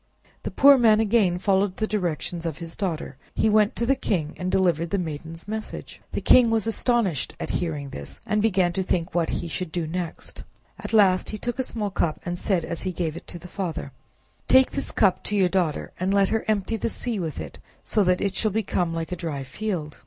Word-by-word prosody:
The - - -4
poor 280 -1 +7
man 220 -3 +5
again 210 -5 +3
followed 190 0 +1
the 220 - +1
directions 175 -4 -2
of 155 -3 -4
his 170 -1 -7
daughter; 165 -8 -3 0.2
he 220 - +3
went 215 +2 +3
to 235 - 0
the 270 - +4
king 170 - -1
and 180 0 -2
delivered 170 -3 +2
the 200 - 0
maiden's 165 0 -5
message. 220 +1 -6
The - - -1
king 245 -2 +6
was 225 -1 +1
astonished 225 - 0
at - - -3
hearing 150 -5 -3
this, 70 0 -7
and 210 0 +1
began 190 -5 +2
to 190 - -1
think 180 -1 -1
what 170 -2 +1
he - - -2
should 180 0 -4
do 170 -1 -2
next. 170 +1 -5 0.4
At - - -6
last 195 -4 +4
he 215 - -4
took 240 +3 -3
up - - -16
a - - +2
small 210 -3 -3
cup, 160 -4 0
and 175 0 -3
said 180 -5 0
as 170 - -4
he 185 - -2
gave 165 -3 -2
it 170 - -9
to - - -8
the 175 - -11
father— 180 -3 -4 0.6
"Take 260 0 +6
this 275 - -2
cup 195 -4 +2
to 210 - -1
your 190 -3 +3
daughter, 175 -5 0
and 185 +2 0
let 200 -1 +3
her 225 0 0
empty 215 +1 0
the 220 - -1
sea 230 -2 -2
with 160 - -4
it, 80 -2 -8 0.2
so 210 - +2
that 180 -1 +2
it 195 -1 -1
shall 215 - +1
become 185 -5 -1
like 165 +1 -4
a - - -1
dry 160 -6 -4
field." 155 +1 -4
185 Hz, 225 wpm, -25 LUFS, 165-215 Hz, 0.6 s, poor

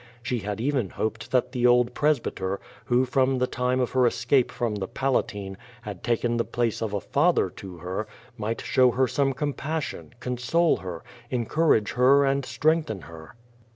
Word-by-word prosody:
She 120 0 -1
had 105 +1 -4
even 130 -5 0
hoped 110 - -4
that 125 -1 +1
the 125 -1 +2
old 125 0 +4
pres 150 0 +2
byter, 95 -3 -3 0.3
who 125 +1 +3
from 130 +1 +2
the 125 - +2
time 125 0 -1
of 125 - 0
her 130 -1 +4
escape 120 +2 +2
from 120 -3 -2
the 100 -2 -3
Palatine, 105 -7 -2 0.3
had 100 -5 -7
taken 120 0 0
the 115 - +2
place 120 -2 -1
of 110 -2 -2
a - - 0
father 145 - +2
to 95 -1 -10
her, 90 +5 -4 0.3
might 110 -1 -3
show 130 -1 +4
her 130 +2 +2
some 135 +3 +1
com 145 +2 -2
passion, 155 -5 -5
console 125 +8 +1
her, 90 -3 -7 0.3
encourage 125 -2 +2
her 135 +3 +5
and 135 0 +1
strengthen 155 - +1
her. 80 +3 -12
125 Hz, 180 wpm, -26 LUFS, 105-135 Hz, 0.3 s, her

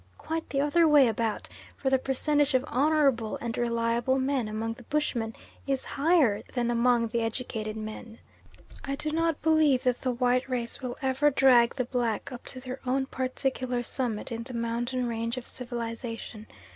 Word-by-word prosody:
Quite 325 0 -4
the 275 - 0
other 320 +3 +4
way 295 -4 +7
about, 225 -1 -1 0.3
for 265 - -1
the 265 - +4
percentage 290 +2 +1
of 255 - +3
honourable 275 -5 +2
and 235 0 -3
reliable 235 +1 +1
men 265 -3 0
among 220 +1 -3
the 230 - -14
bushmen 235 -7 -1 0.3
is 270 -1 -1
higher 285 - +3
than 240 -1 +1
among 235 -1 +3
the 235 +1 0
educated 220 -2 -3
men. 220 +1 -7 0.7
I 275 0 -2
do 305 +2 -2
not 330 0 0
believe 310 -5 +4
that 250 -1 +1
the 260 - -1
white 250 +1 +1
race 240 -2 -3
will 250 -2 -4
ever 265 +3 +3
drag 255 -4 +5
the 255 - -1
black 240 -2 -2
up 245 - -9
to 255 - -6
their 255 0 -6
own 265 +1 0
particular 255 -1 -2
summit 240 -3 -3
in 230 0 -3
the 245 +1 -8
mountain 240 +2 -1
range 230 +1 -2
of 250 - -5
civilisation. 230 -2 -6
250 Hz, 170 wpm, -28 LUFS, 230-270 Hz, 0.7 s, way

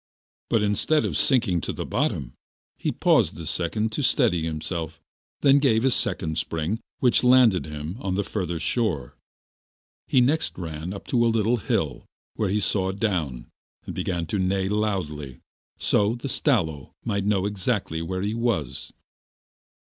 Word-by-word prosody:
But, 110 - +2
instead 105 +9 +2
of - - -2
sinking 115 - +3
to - - -3
the - - -5
bottom, 60 -4 -1 0.4
he - - -2
paused - - +2
a 85 - -6
second 105 +8 -1
to 145 - -2
steady 120 - +3
himself, 80 0 -4 0.4
then 140 0 +6
gave 125 -4 +3
a 135 - +4
second 80 -7 0
spring 80 +8 -2 0.2
which 125 -1 +4
landed 125 -9 +5
him 75 +5 -6
on 95 -7 -2
the 100 - 0
further 90 -4 -3
shore. 80 - -1 0.9
He 130 - +4
next 145 +6 +1
ran 80 -1 -5
on 100 - -6
to 120 -2 +1
a - - +4
little 115 +1 +2
hill 105 - -2 0.3
where 105 -3 0
he 105 +3 +1
saw 95 -2 0
down 90 - -2 0.3
and - - -5
began 85 -3 -2
to 95 +5 -2
neigh 95 +1 0
loudly, 90 -11 -2 0.4
so 105 +2 +2
that 120 - -13
the 140 - -2
Stalo 85 - 0
might 100 -4 0
know 100 -2 +2
exactly 100 -4 -1
where 95 +3 -3
he 105 +2 -1
was. 115 - -2
100 Hz, 160 wpm, -25 LUFS, 80-115 Hz, 0.9 s, then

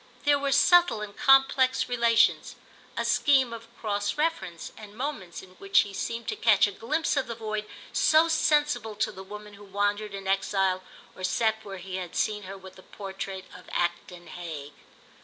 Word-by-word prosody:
There 290 -1 +4
were 280 0 -1
subtle 345 -5 +5
and 205 -1 -7
complex 270 -1 +4
relations, 235 -2 +2 0.4
a - - -1
scheme 265 -4 +3
of 230 0 -9
cross 205 0 -2
reference, 300 - -2
and 210 -1 -12
moments 240 - -5
in 185 - -15
which 395 0 +4
he 200 - -6
seemed 230 +3 -4
to - - -2
catch 215 -4 +4
a 205 - -3
glimpse 305 +13 -1
of 275 - 0
the 230 - -5
void 215 -1 -4 0.3
so 315 +1 +4
sensible 295 -8 +1
to 215 +1 -1
the 190 - -10
woman 210 +2 -10
who 205 0 -13
wandered 205 +1 -1
in 195 0 -8
exile 195 -1 +1 0.3
or 185 - -10
sat 220 +3 0
where 195 -1 -7
he 185 +1 -6
had 180 -2 -6
seen 210 -1 0
her 195 - -7
with 190 -1 -13
the - - -13
portrait 195 -1 -7
of 180 - -13
Acton 175 0 -2
Hague. 155 -4 -8
210 Hz, 180 wpm, -27 LUFS, 190-250 Hz, 0.4 s, subtle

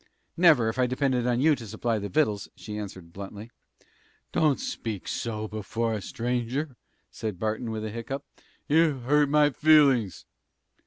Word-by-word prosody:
"Never, 160 -10 +5
if 110 +3 -2
I 125 - +3
depended 130 -1 0
on 120 -1 +1
you 155 +2 +5
to 120 -4 -9
supply 110 +1 -1
the 100 0 -5
vittles!" 110 -10 0
she 105 - -8
answered, 95 -5 -8
bluntly. 100 +3 -8 0.8
"Don't 150 -5 +2
speak 110 -5 -5
so 110 -2 -3
before 110 +2 -2
a 105 - -3
stranger," 125 +6 -2 0.4
said 105 -4 -5
Barton, 110 +4 -2
with 110 -1 -4
a 110 - -4
hiccough. 125 +5 -5 0.4
"You 155 -3 +3
hurt 145 +3 +3
my 150 0 +4
feelin's." 135 - +4
120 Hz, 155 wpm, -27 LUFS, 110-140 Hz, 0.8 s, Never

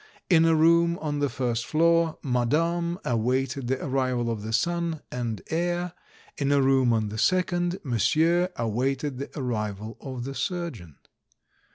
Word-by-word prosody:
In 165 -2 +6
a 165 0 +4
room 170 +2 +4
on 150 -3 -3
the 145 -1 +1
first 120 -3 -1
floor, 165 +2 +2
madame 165 +7 0
awaited 125 +2 0
the 130 +1 -1
arrival 130 -3 0
of 110 -2 -4
the 110 +1 -5
son 170 +5 -1
and 120 -3 -3
heir; 175 +1 -1 0.5
in 140 -1 +1
a 140 - +4
room 135 -2 +3
on 110 -2 +1
the 110 +1 -5
second, 175 +1 +1
monsieur 160 - +2
awaited 130 +4 -1
the 140 - -5
arrival 110 -3 -3
of 130 -3 -6
the 135 +2 -5
surgeon. 140 - -4
135 Hz, 150 wpm, -26 LUFS, 120-170 Hz, 0.5 s, In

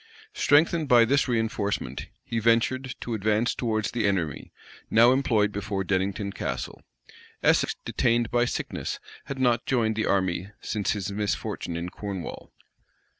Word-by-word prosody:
Strengthened 155 +2 +3
by 120 -3 +6
this 140 +5 +2
reënforcement, 110 - -2 0.2
he 115 -1 -2
ventured 115 +3 +1
to 120 - -4
advance 110 +2 +1
towards 110 -3 -1
the 115 -4 0
enemy, 85 -8 -2 0.4
now 120 +2 +6
employed 115 -6 +2
before 100 -1 -3
Dennington 100 +2 -1
Castle.[*] - - -4 0.6
Essex, - - +3
detained 120 -1 +1
by 120 0 +3
sickness, - - -3 0.3
had 140 - -5
not 120 -3 +1
joined 115 -4 +1
the 110 - 0
army 95 -1 0
since 105 -3 -1
his 100 -1 -4
misfortune 100 -4 -3
in 85 +1 -4
Cornwall. 100 -2 -6
110 Hz, 135 wpm, -26 LUFS, 100-120 Hz, 0.6 s, by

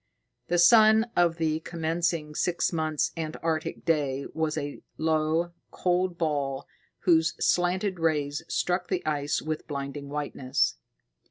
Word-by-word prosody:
The 175 - +1
sun 220 +5 +6
of 170 -1 +3
the 160 -1 0
commencing 165 -1 -2
six 175 +3 0
months' 155 -2 0
Antarctic 160 0 -3
day 140 -4 0
was 160 0 -1
a 145 -1 -4 0.2
low, 160 +2 +1 0.2
cold 180 -1 0
ball 140 -4 -1 0.4
whose 160 -2 +3
slanted 180 +1 +1
rays 150 -2 0
struck 180 0 0
the 185 -2 -2
ice 145 -1 -1
with 155 0 -4
blinding 140 0 -5
whiteness. 140 - -1
160 Hz, 120 wpm, -27 LUFS, 150-175 Hz, 0.4 s, sun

